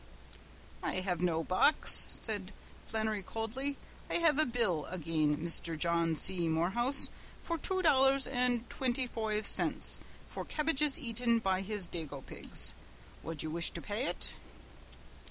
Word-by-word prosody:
"I - - -3
hev 180 -3 -3
no 165 -2 0
box," 185 - +6
said 205 -3 0 0.4
Flannery 220 -1 -2
coldly. 235 +8 -5 0.3
"I - - -2
hev 325 -4 +2
a 310 - +3
bill 210 - -1
agin 155 -3 -1
Misther 165 -1 0
John 170 +1 0
C. 170 +1 +3
Morehouse 235 - +2 0.3
for 335 -1 -4
two 375 +4 -1
dollars 270 -3 +4
and 245 -2 -1
twinty 255 0 -2
foive 220 -2 -3
cints - - +3 0.3
for - - -7
kebbages 300 -1 +1
aten 235 -3 +1
by 190 -4 -1
his 205 -1 -1
dago 150 -6 -7
pigs. - - -1 0.5
Wud 165 -2 -4
you 155 - -5
wish 165 +1 +2
to - - -5
pay 220 +7 -3
ut?" - - -3
215 Hz, 140 wpm, -31 LUFS, 170-260 Hz, 0.5 s, box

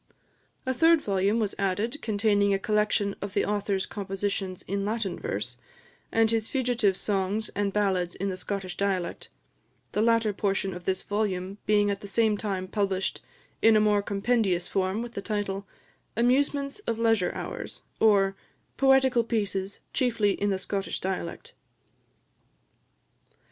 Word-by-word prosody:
A 260 - +1
third 325 +4 +5
volume 200 -2 +1
was 210 -3 0
added, 205 +8 -1
containing 205 -2 +2
a - - +2
collection 210 0 +1
of 200 0 -5
the 200 - +2
author's 200 -2 0
compositions 195 -1 -3
in 200 +1 -2
Latin 210 -2 -2
verse, 470 +3 -4 0.5
and 225 0 +3
his 225 -1 0
fugitive 240 -7 +1
songs 205 +1 -1
and 205 -1 -1
ballads 190 -4 0
in 195 - -2
the 190 - -2
Scottish 185 -1 -4
dialect 190 -3 -2 0.6
the 210 - 0
latter 230 -2 +3
portion 195 -1 -1
of 175 0 -9
this 190 0 -1
volume 200 -2 -2
being 205 -1 +4
at 200 0 -4
the 205 - -7
same 220 +1 +2
time 195 -3 -3
published 195 -1 -1 0.4
in 225 0 +6
a - - +6
more 210 -1 +3
compendious 200 -3 +1
form, 195 +3 0
with 240 0 -8
the 200 - -4
title, 200 -2 -3 0.5
"Amusements 275 - +2
of 230 - 0
Leisure 225 -5 +2
Hours; - - -6 0.2
or, 195 -3 +4 0.4
Poetical 265 -3 +4
Pieces, 200 -4 -2
chiefly 230 -5 +2
in 205 +1 0
the 195 - +1
Scottish 195 +1 -3
dialect." 185 -3 -4
205 Hz, 145 wpm, -27 LUFS, 195-225 Hz, 0.6 s, in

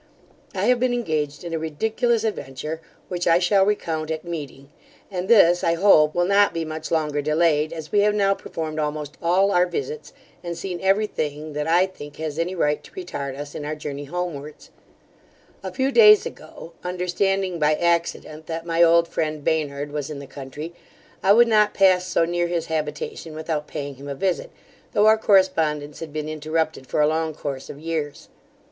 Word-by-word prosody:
I 190 +1 0
have 250 +1 +3
been 250 0 +1
engaged 155 -10 -2
in 170 -1 -5
a 165 - -1
ridiculous 220 +9 0
adventure, 155 -6 -4 0.3
which 175 -1 -3
I 165 0 +6
shall 190 +2 +3
recount 160 -6 -1
at 160 +1 -4
meeting; 145 -4 -7 0.4
and 185 -1 -3
this, 175 -6 +5
I 170 - +2
hope, 160 -5 +5
will 175 0 +2
not 200 +1 +3
be 165 -1 -1
much 155 0 -6
longer 150 -3 0
delayed, 155 0 +2
as 160 -2 -7
we 205 - +3
have 210 +1 +3
now 195 -1 +3
performed 155 -4 -5
almost 150 -1 -3
all 185 +4 +3
our 180 -1 +3
visits, 450 - -5 0.3
and 170 -1 -5
seen 180 0 -5
every 195 +3 +3
thing 150 -5 -4
that 150 +1 -2
I 175 +3 +4
think 145 -6 -11
has 155 -1 -5
any 180 +3 -1
right 150 -3 0
to - - -15
retard 140 - -5
us 145 0 -7
in - - -6
our 150 +1 -3
journey 145 -1 -6
homewards 155 -2 -6 0.9
A 190 - -5
few 265 +8 0
days 425 0 +7
ago, 170 - -10
understanding 180 +1 -1
by 150 0 +3
accident, 170 -2 -1
that 165 0 -4
my 165 0 +1
old 170 0 +5
friend 155 -2 -3
Baynard 145 -2 -1
was 145 -1 -4
in 150 - -6
the 140 - -8
country, 140 +4 -8 0.5
I 195 - +4
would 235 +3 +7
not 210 -2 +3
pass 185 -2 +4
so 165 - +2
near 175 +1 0
his 170 -1 -2
habitation 155 +1 -4
without 155 -1 -3
paying 140 -2 -6
him 140 +1 -10
a 140 - -4
visit, 185 +4 -1 0.4
though 210 0 +4
our 220 0 +6
correspondence 160 -8 +2
had 165 -2 -7
been 155 0 -4
interrupted 155 -2 -2
for 150 - 0
a 150 - +5
long 160 0 -1
course 140 -3 -5
of 140 - -8
years. 155 -2 -4
165 Hz, 190 wpm, -23 LUFS, 150-185 Hz, 0.9 s, days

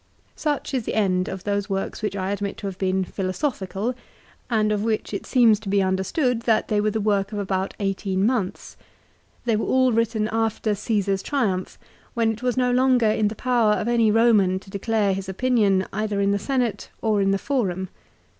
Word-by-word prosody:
Such 295 -2 -2
is 250 -4 -1
the - - -3
end 185 -4 +1
of 190 -1 -6
those 205 0 -1
works 195 +2 -3
which 210 -2 -2
I 190 0 -2
admit 200 0 -3
to - - -8
have 195 -2 -5
been 190 0 +1
philosophical, 195 - -2 0.6
and 215 -3 +2
of 210 -1 0
which 220 -1 -1
it 200 - -4
seems 230 -5 +4
he 200 -1 +1
understood 190 - 0
that 220 - +2
they 210 -1 +2
were 215 - +1
the 220 +1 -2
work 200 -1 0
of 210 - -4
about 190 -1 -2
eighteen 195 -1 -1
months. 220 -5 -2 0.7
They 230 -2 +2
were 215 - -1
all 260 -1 +3
written 225 -1 +1
after 225 -1 0
Caesar's 200 -2 -1
triumph, 200 -10 -1 0.4
when 230 -1 +2
it 225 +1 -7
was 250 0 -1
no 250 -1 +2
longer 250 -3 +3
in 215 -1 +1
the 215 - -4
power 235 -3 +2
of 210 - -2
any 235 -2 +3
Roman 210 -4 +4
to 195 - -15
declare 205 0 0
his 190 0 -5
opinion 200 -3 +2
either 210 0 -1
in 200 0 +2
the 200 - +1
Senate 245 -3 -1
or 215 -2 +2
in 195 - +2
the 195 - +2
Forum. 195 -8 -1
210 Hz, 195 wpm, -23 LUFS, 195-230 Hz, 0.7 s, seems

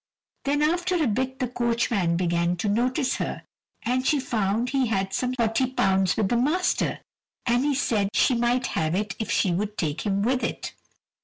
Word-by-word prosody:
Then 290 +2 +1
after 350 +4 +1
a 325 -3 +2
bit 260 +3 -1
the 255 -2 -1
coachman 235 -7 0
began 170 0 +1
to 180 +4 -3
notice 255 +5 +1
her, - - -4 0.4
and 250 +2 0
she 290 +2 +2
found 225 -1 0
he 270 -3 +1
had 195 -3 -1
some 250 0 -1
£40 225 -6 +1
with 215 -3 +2
the 240 - +2
master, 315 +9 +1 0.4
and 245 +1 +2
he 290 -1 +1
said 215 -7 +1
she 260 - +4
might 240 +1 +1
have 160 +1 0
it 205 +1 -2
if 220 - -3
she 185 - +2
would 210 +4 -2
take 155 -2 -2
him 200 -1 0
with 255 +3 +1
it. - - -3
235 Hz, 180 wpm, -25 LUFS, 195-260 Hz, 0.4 s, she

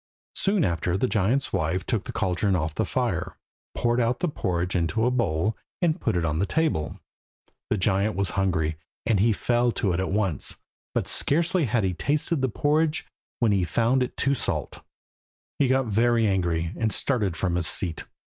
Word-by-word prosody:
Soon 195 -2 +2
after 85 +1 0
the 115 - +1
giant's 120 +4 +1
wife 90 +1 0
took 110 -4 -1
the - - -5
caldron 95 +1 0
off 80 -3 -1
the - - 0
fire, - - -2 0.4
poured 120 0 +1
out 120 +2 +1
the 180 - 0
porridge 90 - -2
into 90 +6 +1
a 125 - +2
bowl, 105 -4 0 0.2
and 165 -4 +1
put - - 0
it 85 - 0
on 75 0 0
the 100 - +1
table. 155 - -1 0.7
The 110 - +1
giant 100 +2 +1
was 100 -2 +1
hungry, 80 -5 0 0.3
and 110 -4 +2
he 115 +4 +4
fell 120 +3 +1
to 95 -4 0
at 95 +2 -1
once, 95 -8 0 0.4
but - - 0
scarcely 170 +2 +2
had 115 -2 +1
he 95 -1 0
tasted 145 - 0
the 130 - +1
porridge 150 +5 +1 0.4
when 115 -3 +4
he 95 -2 +2
found 120 +8 +2
it 125 - -2
too 140 - +2
salt. 80 - -3 0.8
He 140 - +4
got 130 0 +2
very 115 +1 +2
angry, 85 -4 0
and 110 -1 0
started 105 - 0
from 90 +2 0
his 85 -1 +1
seat. 85 -5 0
105 Hz, 185 wpm, -25 LUFS, 90-125 Hz, 0.8 s, he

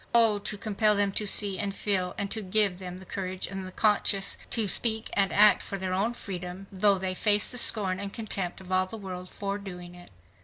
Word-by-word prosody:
O 225 -3 +4
to 205 +1 -1
compel 210 0 +1
them 200 -1 +1
to 210 +1 -1
see 200 -1 +4
and 200 -1 -2
feel 185 -3 -1
and 200 -1 -4
to 220 - -2
give 195 -1 +2
them 180 -1 -8
the 190 - -13
courage 185 -1 -5
and 190 -1 -7
the - - -9
conscience 200 -1 +2
to 225 -3 +3
speak 220 +2 +1
and 195 -1 +1
act 210 0 +5
for 195 - -6
their 185 -1 -4
own 215 +6 -1
freedom, 180 -1 -8
though 200 +1 +2
they 185 0 -3
face 205 +2 +3
the 250 - -1
scorn 195 -6 +3
and 200 0 -5
contempt 195 -5 -1
of 185 -1 -13
all 185 0 +1
the 225 - -9
world 185 -3 -8
for 200 0 -5
doing 180 -3 -10
it!" 175 0 -15
195 Hz, 225 wpm, -27 LUFS, 185-210 Hz, -, act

